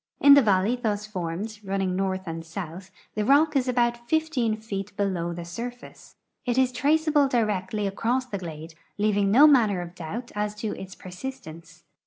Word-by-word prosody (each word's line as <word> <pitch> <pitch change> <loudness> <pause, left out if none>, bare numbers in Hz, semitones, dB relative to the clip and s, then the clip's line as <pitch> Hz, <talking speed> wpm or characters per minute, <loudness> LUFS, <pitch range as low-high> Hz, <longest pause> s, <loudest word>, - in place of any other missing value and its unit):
In 285 - +8
the 280 - +8
valley 205 +1 +2
thus 210 -4 -2
formed, 200 +2 -5
running 195 -1 -1
north 190 0 -1
and 165 -1 -5
south, 175 +2 -7 0.2
the 210 - -1
rock 290 +6 +4
is 265 -2 +2
about 240 -1 0
15 315 -9 +1
feet 205 -2 -6
below 185 -4 -1
the 170 0 -6
surface. 240 +8 -8 0.3
It 245 -1 -1
is 260 -1 +3
traceable 295 +2 +2
directly 210 -4 0
across 235 +6 0
the 205 -6 -5
glade, 160 -2 -8 0.2
leaving 205 -1 +2
no 260 +9 +7
manner 230 -10 +5
of 175 -1 -7
doubt 200 +8 -6
as 210 0 -2
to 210 0 -4
its 190 0 -9
persistence. 180 -4 -9
210 Hz, 170 wpm, -26 LUFS, 185-245 Hz, 0.3 s, In